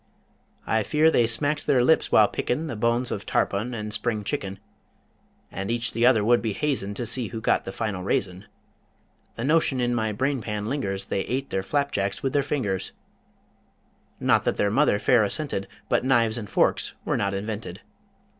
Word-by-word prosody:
I 110 - +1
fear 155 +8 +3
they 120 -6 +3
smacked 145 +6 0
their 125 -3 +4
lips 160 +5 +3
while - - +6
pickin' 150 +7 -2
The 145 - -4
bones 115 +3 0
of - - -3
tarpon 115 +5 -1
and 105 -1 -4
spring 110 -1 -1
chicken, 100 -5 -4 0.9
And 95 +2 -5
each 115 0 0
the 115 +1 +3
other 110 -5 +4
would 120 +1 +4
be 110 -3 -2
hazin' 115 -7 -2
To 120 - -3
see 120 0 0
who 115 - -6
got 110 - +1
the 95 - -5
final 105 -3 -3
raisin. 95 0 -2 0.9
The 115 - -5
notion 145 -2 +2
in 120 0 +1
my 110 -2 0
brain 135 +4 -1
pan 105 -1 -4
lingers 100 -7 -3
They 95 - -1
ate 135 +2 -3
their 95 - 0
flapjacks 100 -5 -1
with 135 - -1
their 145 - +3
fingers 110 -10 -2 1.3
Not - - +3
that - - 0
their 100 - +1
mother 135 -2 +3
fair 120 +1 +3
assented, 105 -3 -2 0.2
But - - +1
knives 120 -3 +2
and 105 -3 -8
forks - - +1
were - - 0
not 100 0 -1
invented. 105 +2 -5
115 Hz, 185 wpm, -25 LUFS, 105-130 Hz, 1.3 s, while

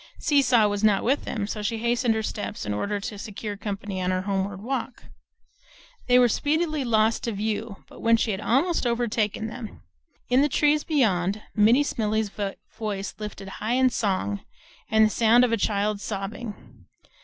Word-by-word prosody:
Seesaw 260 -7 +4
was 205 0 -2
not 205 -2 +4
with 270 +5 +1
them, 210 -3 -2
so 210 +1 -4
she 225 +2 -1
hastened 235 0 +1
her 220 - -1
steps 210 - -4
in 105 - -2
order 200 - -2
to 200 +1 -6
secure 210 0 -6
company 200 -1 -4
on 180 - 0
her 185 0 0
homeward 195 0 -2
walk. 255 0 -4 1.0
They 250 0 +5
were 250 -1 +6
speedily 305 +4 0
lost 225 -2 +2
to 230 - -1
view, 215 0 -3
but - - -14
when 230 0 +4
she 225 - 0
had 190 0 -3
almost 275 +5 +1
overtaken 230 -3 0
them 225 +1 -6
she - - -15
heard, - - -18 0.5
in 250 +2 +4
the 295 - +3
trees 295 +1 +2
beyond, 210 - +1
Minnie 225 +7 +5
Smellie's 220 -5 -1 0.5
voice 205 -2 -3
lifted 205 -2 -7
high 220 +3 0
in 255 0 +3
song, 185 - -1 0.5
and 220 0 +5
the - - +2
sound 230 +2 +5
of 240 - -2
a - - +4
child's 205 0 0
sobbing. 195 - -7
220 Hz, 180 wpm, -25 LUFS, 200-240 Hz, 1.0 s, were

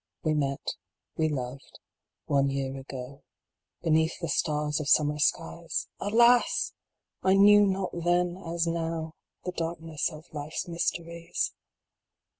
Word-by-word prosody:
We 155 - +2
met 140 -2 -1 0.4
we 155 -1 +1
loved 130 -1 -5 0.5
one 140 -1 +2
year 135 -1 -2
ago, 135 0 -8 0.6
Beneath 160 +1 +2
the 170 -3 -3
stars 150 +1 0
of 150 -1 -3
summer 150 0 +4
skies; 165 +2 -1
Alas! 235 +4 +4 0.5
I 190 0 +4
knew 205 +1 +7
not 190 -1 -1
then, 175 +1 +1
as 170 -2 -2
now, 165 -1 -2 0.3
The 180 - -1
darkness 165 -2 -3
of 155 +1 -11
life 150 +1 -6
s - - -2
mysteries. 170 0 -2
165 Hz, 125 wpm, -28 LUFS, 145-175 Hz, 0.6 s, knew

